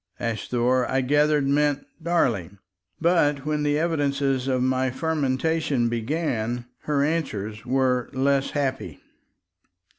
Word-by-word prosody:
"Asthore," 120 +2 0
I 135 0 +1
gathered, 145 +1 +2
meant 145 0 +1 0.2
"darling." 115 - 0 0.4
But 150 -5 +2
when 150 0 0
the 145 0 +1
evidences 140 -5 0
of 130 -1 +1
my 130 0 +1
fermentation 145 -2 0
began, 120 -1 -2 0.2
her 145 -2 +1
answers 120 -8 -3
were 130 -1 +1
less 135 +1 +1
happy. 135 -3 -3
135 Hz, 110 wpm, -24 LUFS, 125-150 Hz, 0.4 s, gathered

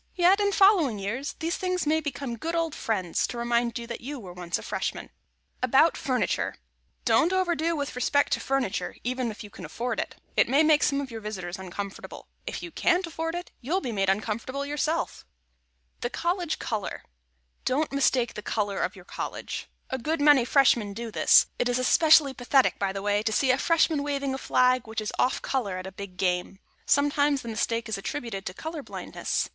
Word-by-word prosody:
Yet, 370 +2 +5
in 405 0 +2
following 385 - +4
years, 230 +9 -3
these 335 +2 -2
things 365 -2 -1
may 310 +2 +3
become 280 -5 -4
good 330 +8 -3
old 330 -2 0
friends 190 - -1
to 245 - -6
remind 235 0 0
you 235 - -5
that 235 0 -6
you 275 +3 -6
were 185 -5 -9
once 175 -1 -3
a - - -9
Freshman. - - -3
[Sidenote: - - -45
ABOUT 265 +6 +4
FURNITURE] 255 -2 -1 0.5
Don't 340 +2 +4
overdo 345 -3 +1
with 285 -4 -3
respect 285 +3 +2
to - - +1
furniture, 255 -9 -1
even 255 0 -1
if 215 - -8
you 205 - -11
can - - -11
afford 245 +1 -3
it; - - -3 0.2
it - - +4
may 280 +5 +5
make 310 -1 +5
some 280 -1 +2
of 270 -3 -7
your 225 -1 -6
visitors 190 -3 -5
uncomfortable. 190 +1 -7 0.2
If - - -4
you 345 - -7
can't 355 +3 +2
afford 325 0 -4
it, 350 +1 -6
you'll 320 +10 0
be 250 - -4
made 195 -3 +1
uncomfortable 225 +7 -1
yourself. 300 +3 -1
[Sidenote: - - -26
THE 240 - -1
COLLEGE 345 +3 -1
COLOR] 215 -4 -4 0.6
Don't 290 +3 +1
mistake 265 -3 +2
the 210 - -6
color 205 -2 -1
of - - -1
your 180 -2 -13
College. - - -5 0.2
A 260 - -1
good 315 +6 -1
many 290 -4 +6
Freshmen 235 -6 +3
do 230 0 -5
this; - - +6
it 245 - +1
is 245 - +1
especially 295 +2 +5
pathetic, 260 +1 +2
by 195 -1 0
the 195 0 -5
way, 205 0 +2
to 220 0 -1
see 260 +4 +3
a 255 - +2
Freshman 320 -3 +3
waving 280 -2 -1
a 265 - -4
flag 255 -2 +2
which 220 0 -3
is 215 0 -4
off 255 - +1
color 210 -9 -1
at 185 - -6
a 190 - -6
big 190 -1 -9
game. 180 +1 0 0.3
Sometimes 285 -1 +3
the 235 - -6
mistake 230 +1 -1
is 215 -3 -3
attributed 210 -3 -4
to 180 - -5
color 320 +3 -5
blindness. - - -3
255 Hz, 205 wpm, -27 LUFS, 210-300 Hz, 0.6 s, many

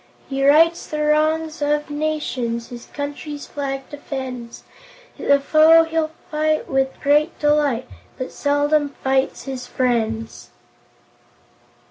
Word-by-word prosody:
He 275 0 -2
rights 325 +4 +4
the 305 -1 -2
wrongs 310 +1 +1
of 295 0 0
nations, 260 -6 -2
His 240 -1 -10
country's 290 0 -6
flag 270 -2 -4
defends, 260 -5 -7 0.6
The 280 0 +3
foe 315 +3 +6
he'll 325 -1 -1 0.2
fight 310 0 0
with 270 0 -1
great 295 +4 +2
delight, 295 -5 +1 0.3
But 255 - -5
seldom 290 0 +1
fights 265 0 0
his 260 -2 -6
friends." 225 -3 -2
290 Hz, 110 wpm, -21 LUFS, 265-305 Hz, 0.6 s, foe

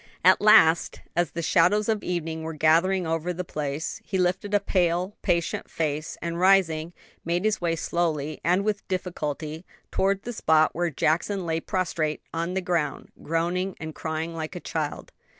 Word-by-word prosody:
At - - +6
last, 170 -6 +5 0.2
as 175 0 +2
the 170 - -5
shadows 195 +6 +3
of 220 -2 0
evening 165 -2 -3
were 160 0 -5
gathering 170 +4 +3
over 165 +2 -1
the 180 +1 -4
place, 150 -2 -4
he 195 - -2
lifted 185 +2 0
a 205 - +4
pale, 180 0 0
patient 170 -3 -1
face; 155 -1 -2
and 170 0 -3
rising, 175 -4 +3 0.3
made 175 +4 -1
his 215 -2 +1
way 170 -1 +1
slowly 155 -3 -2
and 180 +3 +2
with 210 -2 -2
difficulty 160 -4 -4 0.3
towards 195 +1 +1
the 240 - -5
spot 155 -6 +3
where 175 +1 0
Jackson 170 +6 0
lay 165 -1 0
prostrate 165 -4 -2
on 170 +2 -2
the 190 - 0
ground, 170 -6 -2
groaning 175 +4 -1
and 160 -1 -6
crying 160 +2 -4
like 160 +2 -5
a - - -4
child. 155 -3 -4
170 Hz, 170 wpm, -26 LUFS, 160-185 Hz, 0.3 s, At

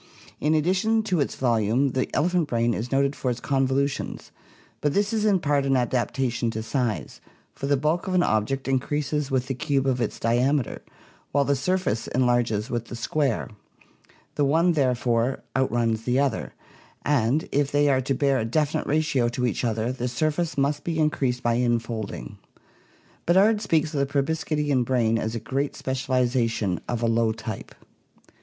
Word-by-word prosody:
In 155 +2 +2
ad 155 - +2
dition 215 +5 +1
to 185 -6 0
its 140 - -1
volume 120 +2 +2
the 130 +1 -1
elephant 175 0 +2
brain 120 -2 +1
is 115 +3 -4
noted 140 +1 +2
for 130 - -2
its 120 -1 -2
convolu 135 +1 +1
tions 140 - -6 0.5
but 145 -1 0
this 205 +2 +1
is 215 -1 +1
in 200 -3 +3
part 145 -3 +1
an 135 -1 +2
adaptation 120 0 0
to 110 -1 -4
size, 120 -2 -2 0.3
for 140 - -5
the 140 0 +3
bulk 155 +6 0
of 185 - -1
an 180 - +4
object 110 +6 0
increases 145 +2 -1
with 130 -2 0
the 135 - -2
cube 135 0 0
of 130 -2 +1
its - - -2
diameter, 125 +3 +1 0.5
while 140 0 +2
the 140 - +2
surface 160 - -1
enlarges 120 -4 +1
with 120 -3 -3
the 120 - -8
square; 135 +1 -1 0.8
the 145 - 0
one 165 +5 +3
therefore 125 -4 +1
outruns 120 -4 +1
the 125 +2 0
other, 140 -4 -1 0.5
and 140 +1 +1
if 140 0 +1
they 145 0 +3
are 135 -2 +3
to 135 +1 -1
bear 140 0 +2
a - - 0
definite 150 +6 0
ratio 145 -5 +1
to 125 +1 -2
each 120 - -1
other 115 0 0
the 125 -1 -3
surface 155 +6 -1
must 140 +1 0
be 165 -2 -2
increased 135 -5 0
by 120 - +2
infolding. 115 - -2 0.9
Beddard 205 +5 +4
speaks 160 -5 +1
of 145 - -1
the 140 - +1
proboscidean 150 -2 0
brain 115 -2 +1
as 110 +1 -3
a - - -2
great 135 +5 -2
specialization 125 -6 0
of 120 -1 -2
a - - +3
low 115 0 +2
type. 110 -1 -7
135 Hz, 175 wpm, -25 LUFS, 120-150 Hz, 0.9 s, an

